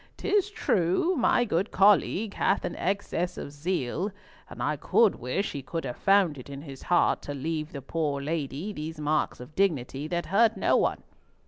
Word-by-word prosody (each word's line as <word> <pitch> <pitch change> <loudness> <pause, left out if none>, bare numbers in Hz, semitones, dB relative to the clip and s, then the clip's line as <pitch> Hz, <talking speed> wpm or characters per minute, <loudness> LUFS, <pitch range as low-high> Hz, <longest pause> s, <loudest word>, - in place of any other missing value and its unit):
'Tis 405 0 +1
true 195 - +1
my 245 -2 +3
good 195 -1 0
colleague 200 +1 +3
hath 195 - +1
an - - -4
excess 185 -2 -2
of - - -6
zeal, 165 +3 -2 0.4
and - - -6
I - - +1
could 225 -4 +3
wish 130 - -2
he 140 - -5
could 165 +5 -4
have 120 - -4
found 195 -7 +3
it 130 - -11
in 140 0 -7
his 135 -4 -10
heart 175 - +2
to 145 - -6
leave 155 +2 -3
the 140 -3 -7
poor 150 -1 -1
lady 150 +5 -3
these 155 -1 -6
marks 150 0 0
of 125 +5 -11
dignity 150 -7 0
that 175 +1 -2
hurt 225 +2 +3
no - - +2
one. - - +1
165 Hz, 185 wpm, -27 LUFS, 145-195 Hz, 0.4 s, my